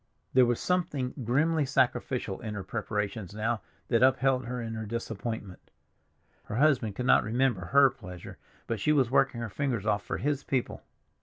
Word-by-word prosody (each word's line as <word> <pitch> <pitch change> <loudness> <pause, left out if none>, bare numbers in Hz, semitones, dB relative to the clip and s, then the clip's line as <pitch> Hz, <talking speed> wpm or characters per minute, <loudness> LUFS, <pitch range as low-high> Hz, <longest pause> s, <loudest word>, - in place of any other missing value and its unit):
There 130 -1 +6
was 120 -1 0
something 150 -8 -1
grimly 150 +7 +2
sacrificial 130 -5 0
in 110 -2 -5
her 100 - -4
preparations 105 -1 -3
now 110 +1 -1 0.3
that 115 -2 +3
upheld 130 -1 +3
her 125 0 -3
in 115 -1 -4
her 110 -1 -5
disappointment; 110 -3 -5 0.8
her - - -5
husband 125 -6 +2
could 125 - -3
not - - +5
remember 115 -4 0
her 135 +9 +5
pleasure, 90 -1 -10 0.3
but 115 -2 -3
she 150 +9 +2
was 130 -5 +2
working 135 -3 +2
her 115 - -4
fingers 125 -5 -2
off 105 -2 +1
for - - -3
his 145 -1 -1
people. 130 -3 -2
120 Hz, 170 wpm, -29 LUFS, 110-135 Hz, 0.8 s, There